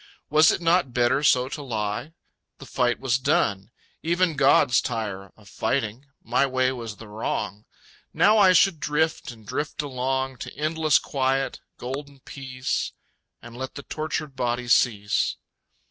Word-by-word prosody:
Was 155 +1 +6
it - - -2
not 165 -6 +2
better 125 +3 +3
so 130 -3 +4
to 145 - -6
lie? 110 +3 -3 0.4
The - - -11
fight 125 -2 0
was 130 -1 +1
done. 100 -5 +1 0.3
Even 170 0 +1
gods 135 -3 +4
tire 105 -5 -4
Of 105 -2 -19
fighting.... 130 +4 -2 0.2
My 125 +4 +2
way 130 -1 +1
was 115 -4 -6
the 115 - -11
wrong. 105 -1 -4 0.5
Now 215 +1 +4
I 190 -2 +7
should 185 -2 +4
drift 155 +2 0
and 115 -3 -11
drift 150 +6 -3
along 130 -1 -2
To - - -7
endless 155 0 +2
quiet, 135 0 -1 0.2
golden 140 +2 -6
peace... 130 -1 -4 0.5
And 120 - -11
let 130 +1 -6
the 140 - -7
tortured 155 -2 -4
body 125 -1 -2
cease. 105 -4 +2
130 Hz, 145 wpm, -25 LUFS, 120-150 Hz, 0.5 s, I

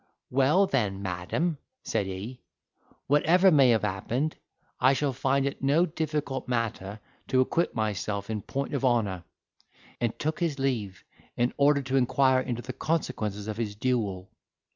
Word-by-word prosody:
"Well, 140 +9 +4
then 105 - -1
madam," 95 - -2 0.2
said 105 -4 -1
he, 100 +7 -6 0.6
"whatever 175 +6 +4
may 140 -5 +6
have 115 -2 +3
happened, 115 +9 -1 0.4
I 130 - +5
shall 140 0 0
find 135 +2 +1
it 140 - -3
no 145 +6 +3
difficult 150 -5 -3
matter 110 -4 -2 0.3
to 130 - +2
acquit 170 +6 0
myself 105 -2 -2
in 110 -2 -3
point 140 +6 -4
of 140 - -1
honour;" 105 -9 +1 0.7
and 120 -2 -1
took 155 +1 -2
his 165 -5 -1
leave 115 -9 -2 0.3
in 120 +1 +1
order 140 0 +3
to 135 +1 0
inquire 130 +1 +3
into 120 -2 -4
the 130 +2 -6
consequences 110 -9 -2
of 110 -1 -4
his 110 -3 -3
duel. 105 -6 -1
130 Hz, 150 wpm, -27 LUFS, 105-140 Hz, 0.7 s, may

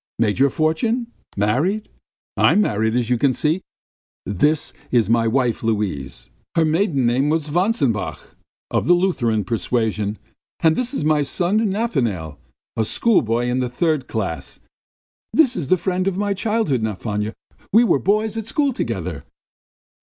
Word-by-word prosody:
Made 110 0 +1
your 140 +1 +5
fortune? 220 - 0 0.3
Married? 150 - +1 0.5
I - - +4
am 210 - +4
married 110 - 0
as 125 -1 0
you 120 - +2
see.... 155 +8 0 0.6
This 145 - 0 0.2
is 115 -3 +2
my 115 -1 +3
wife 120 0 +1
Luise, 105 - -3 0.2
her 165 - +4
maiden 155 - +1
name 130 +5 +2
was 155 -1 0
Vantsenbach... 175 - 0 0.5
of - - 0
the 175 - +6
Lutheran 120 - +1
persuasion.... 110 0 -1 0.4
And 160 -1 +4
this 250 0 -1
is 150 - -1
my 155 -1 +3
son 175 +8 +1
Nafanail, 120 - -1 0.4
a 110 - +1
schoolboy 120 - +2
in 125 +1 0
the 125 -1 -1
third 150 +1 0
class. - - -4 0.7
This 270 -6 +4
is 150 - -3
the 185 - +4
friend 185 +1 -1
of 190 -1 -1
my 205 0 0
childhood, 205 - 0
Nafanya. 105 0 -3 0.4
We 225 +4 +6
were 235 - +3
boys 215 +2 +1
at 225 -1 -4
school 285 +2 +1
together!" - - -4
145 Hz, 150 wpm, -21 LUFS, -, 0.7 s, the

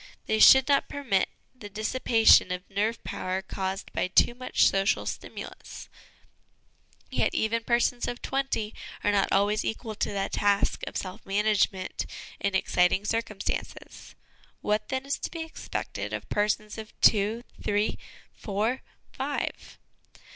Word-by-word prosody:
They 220 - 0
should 265 +3 +8
not 280 -1 +2
permit 235 -10 0 0.2
the 225 -5 -10
dissipation 220 -1 +4
of 180 +1 -4
nerve 215 +4 -1
power 185 +1 -3
caused 190 0 -4
by - - 0
too 185 +5 +4
much 255 +1 +1
social 195 +1 +1
stimulus; - - -7 1.2
yet - - 0
even 225 +1 0
persons 240 +1 +1
of 245 - -4
twenty 270 -6 -2 0.3
are 205 - +3
not 200 -1 +2
always 205 +2 +2
equal 220 0 -4
to 210 - -2
the 195 -1 -1
task 200 -1 +1
of - - -4
self 185 -1 -6
management 195 -2 0 0.3
in 200 -1 -1
ex 190 - -1
citing 180 +3 +3
circumstances. 225 -2 -4 0.5
What 210 0 0
then, 265 0 -2
is 280 - -2
to - - -4
be 330 -1 -5
expected 320 - -5
of - - -4
persons 210 +1 -1
of 220 0 -11
two, 215 +2 +4 0.2
three, 205 +1 0 0.3
four, 215 +5 -2 0.3
five - - -4
210 Hz, 140 wpm, -27 LUFS, 195-235 Hz, 1.2 s, should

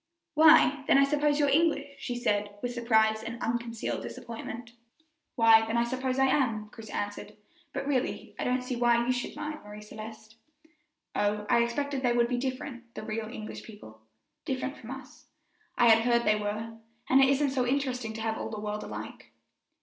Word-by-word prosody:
"Why, 305 -3 +6
then, - - +6
I 275 - +6
suppose 295 +1 +2
you're 290 - +3
English," 285 -1 +1
she 245 - -4
said, 205 -4 -1
with 245 0 -2
surprise 220 -2 +2
and 230 +1 -6
unconcealed 235 -1 -2
disappointment. 230 0 -7 0.6
"Why, 225 -1 +7
then, 225 +1 0
I 235 - +3
suppose 255 +2 -2
I 270 - +4
am," 225 -6 +1
Chris 220 0 -11
answered; 205 0 -5 0.4
"but - - -4
really, 275 -2 -2
I - - -1
don't 250 0 0
see 250 0 -3
why 235 0 +3
you 250 - +2
should 250 0 -3
mind, 300 0 -5
Marie 210 0 -10
Celeste." 215 +1 -10 0.8
"Oh, 210 0 0
I 235 - +5
expected 275 +3 -1
they 245 -2 +2
would 235 0 +3
be 245 -1 0
different, 255 -2 -5
the - - -6
real 220 0 -3
English 215 -2 -7
people 110 - -13 0.4
different 265 +1 -3
from 230 - -12
us. 265 0 -10 0.5
I 240 - +6
had 225 0 +7
heard 235 0 +3
they 215 - +3
were, 215 +2 -4 0.3
and 265 +1 +5
it 270 - +6
isn't 280 0 +2
so 255 -2 0
interesting 255 -4 -1
to 220 - -6
have 220 0 -2
all - - -4
the 215 - -5
world 210 0 -3
alike." - - -8
240 Hz, 190 wpm, -29 LUFS, 220-265 Hz, 0.8 s, Why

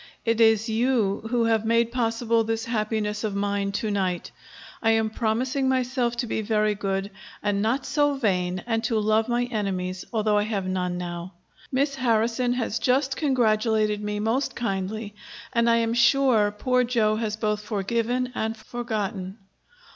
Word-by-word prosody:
It 230 0 +2
is 220 0 +4
you 225 -3 +1
who 240 -1 +2
have 225 -1 +2
made 230 +1 +2
possible 230 -1 +1
this 225 0 -2
happiness 215 -2 -1
of 210 -2 -2
mine 200 0 -1
to 210 +1 -1
night. 185 -3 -1 0.5
I 225 - +2
am 220 -1 +1
promising 255 +5 0
myself 250 -2 0
to 240 - -2
be 220 - -2
very 215 0 +1
good, 195 0 -2 0.3
and 205 -1 +1
not 240 +6 0
so 290 -1 +2
vain, 185 -7 0
and 225 -1 -1
to 230 -2 +1
love 215 +1 +2
my 240 0 +1
enemies, 190 -6 -3
although 215 -2 +2
I - - +1
have 205 -3 -2
none 180 -1 -1
now. 175 +1 -5 0.4
Miss 280 +2 +1
Harrison 240 -1 +1
has 240 -2 -2
just 265 +1 +1
congratulated 220 -6 +1
me 210 0 -2
most 225 +6 0
kindly, 205 -1 -3 0.4
and 235 -1 +3
I 230 - +5
am 230 0 +1
sure 235 -3 +4
poor 250 +5 +1
Joe 225 -3 +1
has 215 -2 -2
both 210 -1 -1
forgiven 230 +4 -1
and 220 -1 -2
forgotten. 215 -6 -4
220 Hz, 160 wpm, -25 LUFS, 210-240 Hz, 0.5 s, I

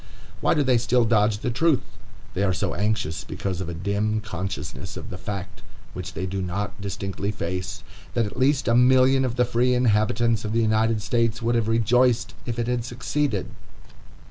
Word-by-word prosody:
Why - - +2
do 150 - +3
they 130 -3 +3
still 120 +1 +2
dodge 110 -2 +3
the 120 +3 -2
truth? 155 +3 +2 0.5
They 95 - -2
are 95 -2 +2
so - - -1
anxious 105 -8 -1
because 95 -2 -4
of 90 - -4
a 85 - -4
dim 100 +4 0
consciousness 90 -7 -5
of - - -8
the 90 - -5
fact, 95 -1 -6 0.3
which 85 -2 -6
they 95 - -2
do 95 +1 -3
not 100 +3 -4
distinctly 100 0 -3
face, 90 -2 -4 0.3
that 115 - +2
at 105 - -6
least 135 +2 +2
a 115 - +3
million 130 +2 +5
of 125 -2 -1
the 125 -1 +3
free 125 +1 +2
inhabitants 115 -1 +2
of 105 0 -3
the 115 - +2
United 110 0 +2
States 115 -1 0
would 120 +1 +2
have 115 -2 +1
rejoiced 120 +2 +2
if 120 -1 -2
it 120 - 0
had 125 0 -1
succeeded. 120 -2 -2
110 Hz, 190 wpm, -24 LUFS, 100-120 Hz, 0.5 s, million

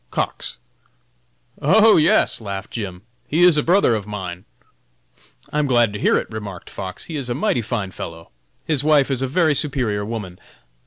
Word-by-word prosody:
Cox. - - -3 1.0
"Oh, 220 +9 +6
yes!" 155 -6 +3
laughed 100 -2 -6
Jim, 95 -5 -6 0.2
"he 160 +6 +2
is 180 -3 +7
a 150 - +3
brother 175 -5 +3
of 105 -2 -3
mine!" 95 -4 -6 1.1
"I 150 - +1
am 150 - +1
glad 120 -5 +3
to 105 - -5
hear - - +3
it!" - - -2
remarked 105 -5 -7
Fox, 95 -1 -6
"he 165 - -7
is 135 -4 -4
a 120 - -1
mighty 145 - 0
fine 105 -4 -3
fellow! 85 -2 -8 0.3
His 150 -4 +1
wife 145 -3 +3
is 130 -1 -1
a 135 - 0
very 155 +3 +2
superior 130 -9 -1
woman. 100 -5 -6
120 Hz, 175 wpm, -21 LUFS, 100-150 Hz, 1.1 s, is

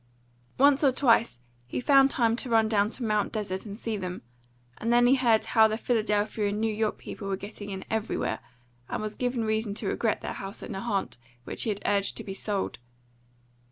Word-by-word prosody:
Once 280 +2 +5
or 275 - +6
twice 230 - +2 0.3
he - - -3
found 275 +1 +5
time 230 -4 +2
to 255 +1 -4
run 225 -1 +4
down 210 -1 +2
to 245 - -7
Mt. 210 -2 +1
Desert 200 -2 -3
and 200 0 -7
see 225 -1 -3
them; 180 -5 -5 0.6
and 230 - -1
then 240 0 +5
he 250 - +6
heard 240 -5 +3
how 220 -2 +5
the 215 0 -2
Philadelphia 215 -2 0
and 205 +1 -2
New 220 0 0
York 215 0 -1
people 200 - -8
were 195 -1 -1
getting 205 +1 -8
in 190 -1 -6
everywhere, 220 0 -2 0.5
and - - -2
was 215 0 -4
given 245 -2 -1
reason 220 -1 -1
to 215 - -2
regret 225 +1 0
the - - -4
house 195 +1 -6
at - - -7
Nahant 195 - -2 0.3
which - - -3
he - - +1
had 205 -1 -3
urged 200 -1 +1
to - - -4
be 195 - -6
sold. 200 0 -3
220 Hz, 205 wpm, -27 LUFS, 205-235 Hz, 0.6 s, or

